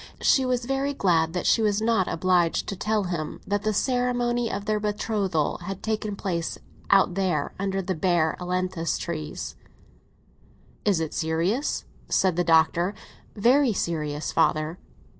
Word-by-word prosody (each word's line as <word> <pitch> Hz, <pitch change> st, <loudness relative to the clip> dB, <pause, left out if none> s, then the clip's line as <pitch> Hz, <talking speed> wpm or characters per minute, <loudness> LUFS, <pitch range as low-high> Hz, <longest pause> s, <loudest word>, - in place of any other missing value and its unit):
She 265 Hz, -2 st, +4 dB
was 250 Hz, -1 st, 0 dB
very 270 Hz, +2 st, -1 dB
glad 165 Hz, -7 st, +2 dB
that 180 Hz, -, -2 dB
she 225 Hz, -, +4 dB
was 210 Hz, -1 st, +2 dB
not 220 Hz, -4 st, +2 dB
obliged 175 Hz, -1 st, +1 dB
to 200 Hz, -, -3 dB
tell 210 Hz, +2 st, 0 dB
him 170 Hz, -4 st, -4 dB
that 205 Hz, 0 st, 0 dB
the 215 Hz, +1 st, 0 dB
ceremony 245 Hz, 0 st, 0 dB
of 200 Hz, 0 st, -4 dB
their 215 Hz, 0 st, +1 dB
betrothal 205 Hz, -6 st, -1 dB
had 190 Hz, +2 st, -6 dB
taken 215 Hz, -2 st, -2 dB
place 170 Hz, -4 st, -3 dB, 0.3 s
out 195 Hz, -2 st, +5 dB
there 175 Hz, -6 st, -1 dB
under 195 Hz, 0 st, -1 dB
the 185 Hz, +1 st, -1 dB
bare 165 Hz, -2 st, +1 dB
ailantus 180 Hz, -1 st, -1 dB
trees. 155 Hz, -3 st, -5 dB, 1.3 s
"Is 200 Hz, -5 st, +3 dB
it 160 Hz, -2 st, -3 dB
serious?" 170 Hz, -, -1 dB, 0.2 s
said 185 Hz, -3 st, +2 dB
the 175 Hz, -, +2 dB
Doctor. 170 Hz, +3 st, +3 dB, 0.4 s
"Very 245 Hz, +4 st, +4 dB
serious, 155 Hz, -5 st, -2 dB
father." 155 Hz, +3 st, +1 dB
190 Hz, 145 wpm, -25 LUFS, 170-215 Hz, 1.3 s, out